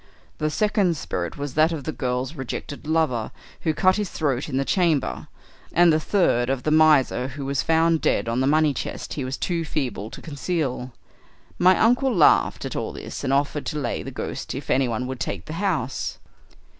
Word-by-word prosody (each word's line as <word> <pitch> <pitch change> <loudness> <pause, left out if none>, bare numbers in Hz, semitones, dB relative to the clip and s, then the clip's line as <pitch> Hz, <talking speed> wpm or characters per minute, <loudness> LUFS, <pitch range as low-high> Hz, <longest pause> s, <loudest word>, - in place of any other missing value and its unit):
The 155 - +1
second 195 -1 +1
spirit 85 -10 -4
was 145 -2 -4
that 155 +3 +4
of 155 -4 -4
the 155 - -3
girl's 125 0 -2
rejected 140 +1 -6
lover, 155 -9 +1 0.3
who 160 - 0
cut 185 +5 +3
his 210 -3 -2
throat 140 -3 -1
in 130 - -2
the 135 - 0
chamber, 165 -6 +1 0.5
and 175 -1 +5
the 155 - +3
third 155 - +2
of 135 -2 -1
the 155 - 0
miser 150 -5 +4
who 135 +1 -6
was 140 0 0
found 165 0 +2
dead - - +1
on 115 +2 0
the 130 - +2
money 155 0 +3
chest - - -5
he 140 - -3
was 130 +1 -3
too 170 -2 -1
feeble 130 -9 -3
to - - -10
conceal. 145 -4 -3 0.7
My 185 +1 +6
uncle 250 +4 +3
laughed 175 -10 +4
at - - -5
all - - -3
this, - - -7
and 135 - 0
offered 140 +1 0
to 150 - -3
lay 125 -5 -2
the - - -6
ghosts - - -5
if - - -4
anyone 125 -2 +1
would 130 0 -5
take 95 -4 -4
the - - -7
house. 155 - -1
150 Hz, 195 wpm, -24 LUFS, 130-165 Hz, 0.7 s, My